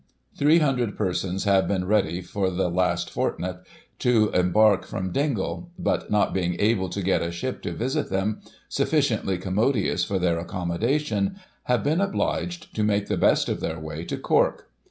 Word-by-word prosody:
Three 150 +3 +4
hundred 125 -9 +1
persons 95 -1 -1
have 100 -2 +3
been 95 -2 0
ready, 95 -3 +1
for 95 +1 -1
the 90 -1 -1
last 90 +1 0
fortnight, - - -2 0.4
to 115 -4 +3
embark 95 +3 +4
from 95 -3 -4
Dingle; 140 - -1
but, 180 - -1
not 105 -1 +2
being 90 -2 0
able 100 -3 +2
to 100 +3 -4
get 95 - +2
a 85 - -1
ship 85 +10 -4
to - - -4
visit 130 +6 -2
them, 95 +3 -1 0.3
sufficiently 95 -2 +1
commodious 100 +1 +1
for 95 +2 -1
their 85 -2 +1
accommodation, 115 - -1 0.3
have 125 -1 +1
been 155 +6 +1
obliged 175 -3 -2
to 110 - 0
make 105 -1 +1
the - - +1
best - - +3
of - - -2
their 80 0 -3
way 80 +1 -6
to - - -3
Cork. - - +1
100 Hz, 170 wpm, -25 LUFS, 90-125 Hz, 0.4 s, Three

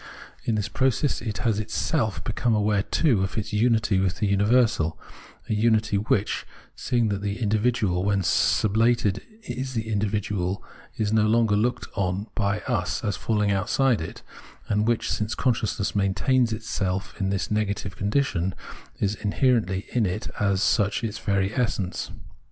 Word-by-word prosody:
In 115 - +1
this 105 -1 -1
process 130 +5 0
it 110 -1 -4
has 110 -3 +2
itself 110 +1 -1
become 120 0 0
aware, 105 -1 +2
too, 120 - +2
of 95 - -2
its 105 - -2
xmity 110 -2 +2
with 95 -1 0
the 100 -2 +1
imiversal, 110 -5 +2 0.5
a - - -1
unity 110 -1 +2
which, 105 -1 0 0.3
seeing 120 -3 0
that 100 -1 -2
the 100 0 -2
individual 105 -4 +1
when 100 -1 +1
sub 100 +4 +2
lated 115 -3 +3 0.2
is 130 - -5
the 110 - 0
miiversal, 100 -2 -1 0.4
is 110 -1 0
no 110 -1 +4
longer 110 -1 +3
looked 120 +4 0
on 95 +1 -1
hy 100 0 0
us 90 - -1
as 105 -2 0
falling 105 -2 0
outside 115 +4 +2
it, 80 - -7 0.4
and 105 +1 +1
which, 120 -1 +1
since 105 +3 -1
consciousness 110 -6 0
maintains 115 +5 +2
itself 95 -3 -2
in 95 -1 0
this 95 -1 0
its - - -6
negative 105 -2 -1
condition, 100 -5 0 0.4
is 100 0 +1
in 105 -1 -3
herently 110 -8 +1
in 115 -5 +1
it 90 +4 -4
as 100 -1 +2
such 105 0 +2
its 110 -1 -3
very 100 0 0
essence. 115 -7 -1
105 Hz, 160 wpm, -25 LUFS, 100-115 Hz, 0.5 s, no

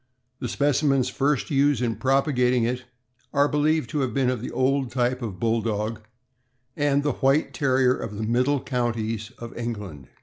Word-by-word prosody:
The 125 - -3
specimens 140 -2 +2
first 140 +2 0
used 140 0 +3
in 120 -2 0
prop 135 +5 +2
agating 125 -3 +2
it 125 +1 -2 0.5
are 140 0 +4
believed 150 -1 +1
to 150 - -1
have 130 -5 -1
been 130 -2 +2
of 125 -4 -3
the - - -4
old 130 0 +1
type 125 +1 0
of 100 -6 -5
Bulldog 110 -1 -1 0.7
and 145 -1 +1
the 145 - +1
White 135 +4 +3
Terrier 130 -2 +2
of 105 -2 -6
the 110 - -3
middle 125 +5 +2
counties 115 -4 -2
of 115 0 -9
England. 105 - -6
125 Hz, 170 wpm, -25 LUFS, 115-140 Hz, 0.7 s, are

